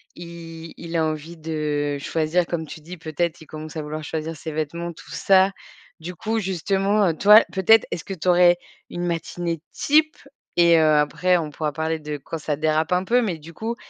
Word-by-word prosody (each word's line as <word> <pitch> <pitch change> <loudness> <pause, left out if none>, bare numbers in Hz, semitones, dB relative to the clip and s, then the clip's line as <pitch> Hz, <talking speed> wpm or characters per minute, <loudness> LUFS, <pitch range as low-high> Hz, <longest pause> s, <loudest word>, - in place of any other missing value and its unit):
il 165 -1 -9
il 170 0 -7
a 160 - +2
envie 155 +2 -4
de 150 -2 -2
choisir 160 +4 0
comme 165 -2 -3
tu 155 - -9
dis, 175 +4 -9
peut-être, 165 +1 -2
il - - -12
commence 155 +1 -8
à - - -2
vouloir 155 +1 -6
choisir 160 +2 -4
ses 160 +1 -7
vêtements, 160 +3 -3
tout - - -15
ça. 190 0 +4 0.5
Du 180 +3 -7
coup, 225 +4 -2
justement, 195 +2 +1
heu, 165 - +2
toi, 210 +2 +8
peut-être, 205 +3 +5
est-ce 160 - -4
que 195 - -6
tu 185 - -6
aurais 175 0 +6 0.3
une 175 0 -4
matinée 170 -1 -3
type? 310 +1 +2 0.4
Et 170 -1 +6
heu, - - +4
après 155 +5 +2
on 155 -3 -3
pourra 150 0 -2
parler 160 +2 -2
de 150 -1 -5
quand 165 +3 -6
ça 150 -1 -2
dérape 155 +1 +1
un 180 +1 +2
peu, 245 +5 +3
mais 190 -8 -2
du 160 +2 -13
coup, 225 +7 -4
165 Hz, 205 wpm, -23 LUFS, 155-180 Hz, 0.5 s, toi